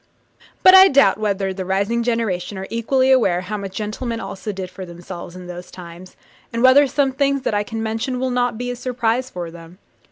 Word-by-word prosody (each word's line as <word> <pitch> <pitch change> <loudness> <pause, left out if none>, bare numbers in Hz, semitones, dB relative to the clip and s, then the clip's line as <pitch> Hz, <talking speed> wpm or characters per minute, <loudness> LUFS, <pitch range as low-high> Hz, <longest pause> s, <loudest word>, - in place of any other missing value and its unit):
But 370 - +8
I 380 0 +10
doubt 265 - +4
whether 200 -2 -1
the 190 0 -5
rising 200 +5 0
generation 220 -5 -2
are 190 - -5
equally 260 +3 +1
aware 195 -9 +3
how 205 +4 -5
much 195 -2 -7
gentlemen 225 +2 -4
also 210 -1 -6
did 185 -2 -7
for 190 - -8
themselves 175 0 -9
in 180 0 -10
those 180 0 -9
times, 175 +1 -12 0.4
and 230 +1 -2
whether 270 +2 +6
some 275 0 +1
things 275 0 0
that - - -1
I 205 - +1
can 225 +1 -5
mention 225 +3 -3
will 260 0 -1
not 245 -2 0
be 245 +1 -3
a - - -5
surprise 245 0 -1
to 175 -2 -6
them. 170 +1 -13
220 Hz, 210 wpm, -20 LUFS, 185-250 Hz, 0.4 s, I